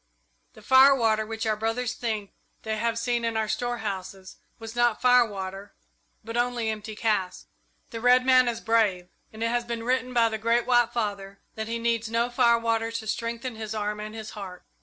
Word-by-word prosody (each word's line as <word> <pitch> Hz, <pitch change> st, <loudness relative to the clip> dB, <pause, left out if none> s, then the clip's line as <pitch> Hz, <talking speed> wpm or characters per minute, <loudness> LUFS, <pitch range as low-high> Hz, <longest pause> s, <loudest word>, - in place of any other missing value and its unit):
"The -, -, -16 dB
firewater 260 Hz, -5 st, +5 dB
which 225 Hz, +1 st, -4 dB
our 215 Hz, -1 st, +1 dB
brothers 225 Hz, +3 st, -2 dB
think 215 Hz, -5 st, -4 dB, 0.3 s
they 220 Hz, 0 st, -2 dB
have 230 Hz, +1 st, -1 dB
seen 235 Hz, 0 st, -1 dB
in 230 Hz, -1 st, -1 dB
our 220 Hz, -1 st, 0 dB
storehouses 200 Hz, -6 st, -4 dB, 0.2 s
was 225 Hz, 0 st, -9 dB
not 240 Hz, -2 st, +2 dB
firewater, 205 Hz, -6 st, +1 dB, 0.5 s
but 230 Hz, +1 st, -7 dB
only 240 Hz, -2 st, 0 dB
empty 215 Hz, 0 st, -7 dB
casks. 210 Hz, -5 st, -1 dB, 0.5 s
The 230 Hz, -, -6 dB
red 250 Hz, +1 st, +5 dB
man 255 Hz, -1 st, +5 dB
is 230 Hz, -1 st, -2 dB
brave, 205 Hz, -6 st, +1 dB, 0.2 s
and 220 Hz, +1 st, -6 dB
it 230 Hz, -, +1 dB
has 240 Hz, 0 st, 0 dB
been 235 Hz, -1 st, -5 dB
written 255 Hz, +1 st, 0 dB
by 235 Hz, -2 st, +3 dB
the 220 Hz, 0 st, -4 dB
Great 230 Hz, +2 st, +1 dB
White 240 Hz, -2 st, +3 dB
Father 200 Hz, -4 st, -3 dB, 0.2 s
that 220 Hz, 0 st, -5 dB
he 230 Hz, +1 st, -2 dB
needs 230 Hz, -1 st, -1 dB
no 235 Hz, +2 st, 0 dB
firewater 230 Hz, -2 st, +2 dB
to 230 Hz, -1 st, -4 dB
strengthen 230 Hz, +2 st, -4 dB
his 220 Hz, 0 st, -5 dB
arm 210 Hz, 0 st, -2 dB
and 215 Hz, +1 st, -7 dB
his 220 Hz, -1 st, -7 dB
heart. 190 Hz, -4 st, -9 dB
225 Hz, 185 wpm, -26 LUFS, 215-240 Hz, 0.5 s, firewater